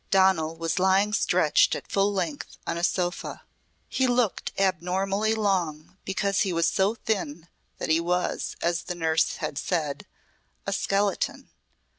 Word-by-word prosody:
Donal 190 -5 +3
was 165 +2 -1
lying 190 +3 +3
stretched - - +3
at - - -6
full 200 +1 +2
length 175 -7 -3
on - - -2
a 170 - -4
sofa. 175 0 -1 0.4
He 260 - +1
looked 245 -4 +1
abnormally 195 +3 +1
long, 180 -7 -1
because 195 +1 0
he 195 - +1
was 165 -1 +2
so 195 +6 +2
thin 175 -8 -3 0.3
that - - -4
he 160 +1 +4
was, 180 +1 -1
as 170 0 +1
the 180 - -4
nurse 160 -1 +1
had 150 -2 -4
said, 155 -6 -2 0.6
a 195 - -1
skeleton. 200 0 -1
185 Hz, 145 wpm, -26 LUFS, 165-195 Hz, 0.6 s, he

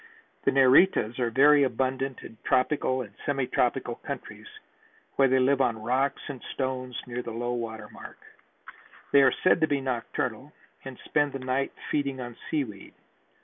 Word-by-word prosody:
The - - +4
Neritas 130 - +4
are 120 -2 +1
very 145 +4 +5
abundant 130 +1 -1
in 115 - -11
tropical 130 -1 +1
and 100 -4 -13
semi 135 -2 0
tropical 125 -1 0
countries - - -8 0.7
where 135 - +5
they 130 0 +3
live 135 +1 +3
on 115 -4 +1
rocks 130 +4 0
and 135 -4 -7
stones 130 -2 -3
near 125 -1 -4
low 120 +1 -4
water 110 -2 -5
mark. - - -12 0.9
They 140 - +7
are 135 - +6
said 185 - +4
to 160 - +4
be 145 -2 0
nocturnal 130 +1 -3 0.3
and 135 -2 -8
spend 145 -2 +1
the - - -3
night 130 +1 -1 0.2
feeding 140 -2 -1
on 120 -2 -7
seaweed. 120 -11 -4
130 Hz, 155 wpm, -27 LUFS, 120-140 Hz, 0.9 s, They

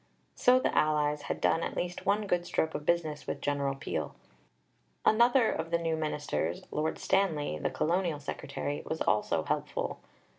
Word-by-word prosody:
So 250 +1 +5
the - - 0
allies 150 -1 +2
had - - -1
done 165 - +2
at - - -3
least 175 0 -3
one 210 +1 +2
good 180 -3 +1
stroke 165 -2 0
of 150 0 -5
business 160 -3 0
with - - -3
General 140 -1 0
Peel. 135 - -4 0.9
Another 235 +2 +5
of 165 +1 -3
the 170 - +2
new 165 -1 -1
ministers 145 - -2
Lord 155 +1 -1
Stanley, 155 - +1
the - - 0
Colonial 170 -2 0
Secretary 145 0 -4
was 160 - -3
also 85 -6 +1
helpful. - - -2
160 Hz, 160 wpm, -30 LUFS, 145-175 Hz, 0.9 s, So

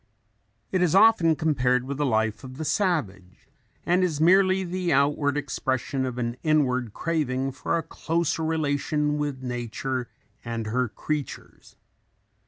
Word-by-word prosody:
It 185 - +1
is 180 -1 +2
often 195 -6 +5
compared 125 -5 +1
with 135 +1 -5
the 145 -1 0
life 110 0 0
of 130 0 -9
the 155 - -4
savage 135 - -2 0.4
and 180 +2 +3
is 160 -5 0
merely 185 +3 +4
the 180 0 -2
outward 145 +1 +2
expression 135 -2 -2
of 125 -1 -5
an 120 0 -2
inward 130 -7 +1
craving 135 -3 -1
for 145 +5 -2
a 165 - -2
closer 165 0 -2
relation 150 -1 0
with 145 -3 -3
nature 125 0 -3 0.3
and 115 -1 -4
her 125 +3 0
creatures. 150 +5 -6
145 Hz, 140 wpm, -25 LUFS, 125-160 Hz, 0.4 s, often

